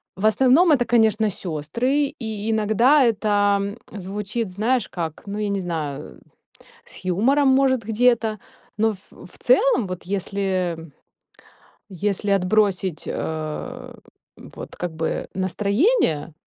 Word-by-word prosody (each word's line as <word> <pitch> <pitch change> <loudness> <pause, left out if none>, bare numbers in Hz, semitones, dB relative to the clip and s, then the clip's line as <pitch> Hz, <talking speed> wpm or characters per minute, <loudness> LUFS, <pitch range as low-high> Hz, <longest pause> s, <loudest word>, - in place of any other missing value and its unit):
В 190 +3 -3
основном 265 +10 +5
это, 250 -5 +3
конечно, 220 -2 +3
сёстры. 220 - -1
И 220 -2 -4
иногда 230 +7 +4
это 205 -2 +1
звучит, 210 +3 -4
знаешь, 225 +7 0
как, 165 -3 -5
ну, 205 +1 -4
я 210 - -1
не 200 -1 -1
знаю, 160 -6 -5 0.7
с - - -8
юмором, 250 +11 +2
может, 265 -2 +3
где-то. 225 0 +1 0.4
Но 220 0 +2
в 190 -2 -13
в 180 - -13
целом, 255 -2 +3
вот 185 -1 -6
если 185 -4 -2 1.0
если 200 +2 -2
отбросить, 190 -3 +1
э, 155 -1 -5 0.6
вот - - -9
как 175 -1 -4
бы 160 0 -3
настроение, 200 - +1
205 Hz, 115 wpm, -22 LUFS, 185-235 Hz, 1.0 s, основном